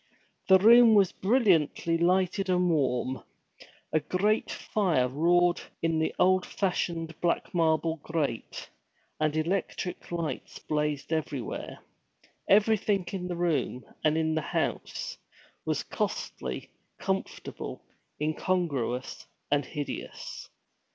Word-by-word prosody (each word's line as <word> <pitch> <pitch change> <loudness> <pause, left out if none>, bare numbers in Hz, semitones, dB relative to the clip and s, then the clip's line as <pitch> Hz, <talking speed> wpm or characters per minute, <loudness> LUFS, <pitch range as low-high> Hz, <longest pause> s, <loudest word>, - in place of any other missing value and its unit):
The 190 - +8
room 230 +3 +7
was 195 -3 +5
brilliantly 190 - +2
lighted 185 +2 +2
and 180 -1 +3
warm. 130 -4 0 0.7
A 155 - +4
great 190 +8 0
fire 175 -12 +1
roared 175 +6 +3 0.2
in 165 -1 +1
the 160 - +1
old 185 0 +4
fashioned 170 -4 -2
black 170 -1 0
marble 165 -1 +2
grate, 150 -5 -3 0.5
and 155 0 +1
electric 180 +2 -2
lights 170 -2 -4
blazed 150 0 -2
everywhere. 145 -5 -4 0.7
Everything 205 -2 +3
in 180 -2 -4
the 175 - -3
room, 155 -7 0 0.2
and 155 0 +3
in 160 0 +1
the 160 - 0
house, - - -3 0.5
was - - -1
costly, 65 -1 -4 0.3
comfortable, - - -4 0.3
incongruous, 150 -6 -1 0.2
and 145 0 +3
hideous. 145 -1 -6
165 Hz, 105 wpm, -28 LUFS, 150-185 Hz, 0.7 s, The